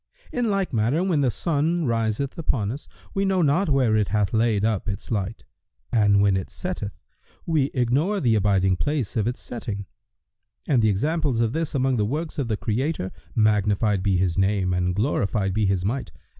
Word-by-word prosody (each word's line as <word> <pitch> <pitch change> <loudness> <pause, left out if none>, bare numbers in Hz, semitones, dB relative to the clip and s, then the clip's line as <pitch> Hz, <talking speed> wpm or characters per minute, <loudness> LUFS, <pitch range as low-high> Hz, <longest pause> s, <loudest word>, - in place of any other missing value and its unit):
[FN#120] - - -2
In 235 -2 +1
like 195 -5 -1
manner, 120 +10 +1
when 175 -6 +1
the 130 - +3
sun 165 +4 0
riseth 115 +3 -1
upon 115 -10 -1
us, 140 +4 -8 0.3
we 195 - 0
know 190 -2 +2
not 160 +5 +2
where 130 -6 +3
it 105 -2 +2
hath 100 0 0
laid 110 -2 +2
up 110 -3 -1
its 100 - -5
light, 100 -4 -2 0.5
and 105 -3 +4
when 100 -2 +3
it 95 - -3
setteth, 175 - -5 0.5
we 155 -5 +2
ignore 140 - +1
the 120 -8 +2
abiding 95 -3 +2
place 145 -5 -2
of 110 -2 +1
its 120 - -2
setting; 100 -4 -5 0.8
and 130 -6 +3
the 110 - +4
examples 145 - 0
of 115 0 +1
this 160 -2 -2
among 130 -1 +1
the 105 - +2
works 155 +7 -3
of 135 - -1
the 110 -2 -1
Creator 115 - -2 0.2
(magnified 105 -2 +2
be 95 -1 +2
His 90 0 0
name 95 -1 +1
and 90 0 0
glorified 100 -4 0
be 105 0 +1
His 95 -2 0
might!) 125 +6 -2
115 Hz, 190 wpm, -24 LUFS, 100-145 Hz, 0.8 s, and